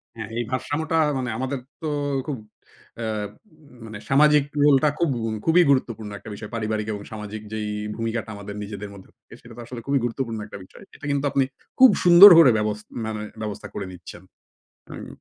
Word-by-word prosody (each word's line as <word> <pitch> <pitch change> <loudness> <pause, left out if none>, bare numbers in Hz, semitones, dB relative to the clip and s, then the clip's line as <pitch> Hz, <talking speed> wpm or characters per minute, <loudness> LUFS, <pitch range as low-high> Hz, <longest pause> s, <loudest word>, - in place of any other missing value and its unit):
হ্যাঁ, 110 -2 -7
এই 120 - 0
ভারসাম্যটা 145 +5 -2 0.2
মানে 125 -2 -3
আমাদের 130 +2 -3 0.2
তো 160 - -3 0.4
খুব 145 -3 -3 0.6
আ - - -3 0.5
উম 150 -5 -20
মানে 110 -1 -8
সামাজিক 150 +1 +5 0.2
রোল 145 -1 +6
টা 150 - +5
খুব 170 -2 +2
গুম 110 -1 -2
খুবই 170 +2 +5
গুরুত্বপূর্ণ 115 -6 0
একটা 110 - -11
বিষয়। 105 +1 -9
পারিবারিক 110 -1 -2
এবং 105 - -6
সামাজিক 105 0 -7
যেই 110 -1 -3 0.3
ভূমিকাটা 115 0 -3
আমাদের 100 0 -8
নিজেদের 100 0 -7
মধ্যে 95 -2 -14
থাকে, - - -19
সেটা 115 - -14
তো - - -7
আসলে 120 0 -8
খুবই 140 0 +2
গুরুত্বপূর্ণ 115 -2 -3
একটা 105 - -10
বিষয়। - - -16
এটা - - -11
কিন্তু 140 0 -1
আপনি 135 - +2 0.4
খুব 260 0 +9
সুন্দর 175 +3 +10
করে 155 -7 +7
ব্যবস 105 0 -1 0.3
মানে 110 -1 -4 0.2
ব্যবস্থা 105 -2 -5
করে - - -5
নিচ্ছেন, 90 0 -12 0.7
হুম। - - -8
115 Hz, 185 wpm, -23 LUFS, 105-140 Hz, 0.7 s, সুন্দর